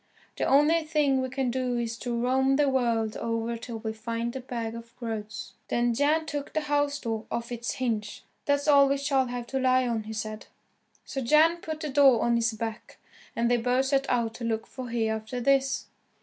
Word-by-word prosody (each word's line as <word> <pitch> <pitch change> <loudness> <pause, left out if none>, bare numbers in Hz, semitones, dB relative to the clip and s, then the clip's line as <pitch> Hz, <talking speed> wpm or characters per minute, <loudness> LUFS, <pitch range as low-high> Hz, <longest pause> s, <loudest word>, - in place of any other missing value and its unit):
The - - 0
only 295 +5 +4
thing 300 -4 +1
we 260 - -2
can 260 -1 -1
do 250 -1 -1
is 235 -1 -2
to 240 -2 -2
roam 265 +2 +2
the 290 0 +3
world 235 -5 +1
over 230 0 -2
till 230 0 -6
we 220 0 -4
find 230 +1 -3
the 265 - -4
bag 235 -3 -4
of 230 0 -10
groats." 220 -3 -5
Then 240 0 +1
Jan 300 +5 +2
took 290 -2 -5
the 310 - +1
house 290 -1 0
door 225 -4 -3
off 235 +1 -4
its 235 0 -3
hinges, 220 -5 -3 0.2
"That's 285 +1 +1
all 280 -2 +7
we 280 - +2
shall 275 -2 +1
have 245 -1 -4
to 265 +2 -2
lie 255 -1 +3
on," 225 -2 -2
he 220 - -6
said. 215 0 -5 0.6
So 270 - -4
Jan 310 +7 +5
put 315 -2 -6
the 305 - -3
door 270 -4 +5
on 235 0 +2
his 235 0 +1
back, 225 +1 -6 0.4
and 235 - 0
they 245 - +4
both 250 +3 +1
set 275 0 +1
out 235 -2 +1
to 240 - -8
look 225 -1 -1
for 260 -1 -8
Hereafterthis. 240 +4 0
245 Hz, 205 wpm, -27 LUFS, 230-275 Hz, 0.6 s, all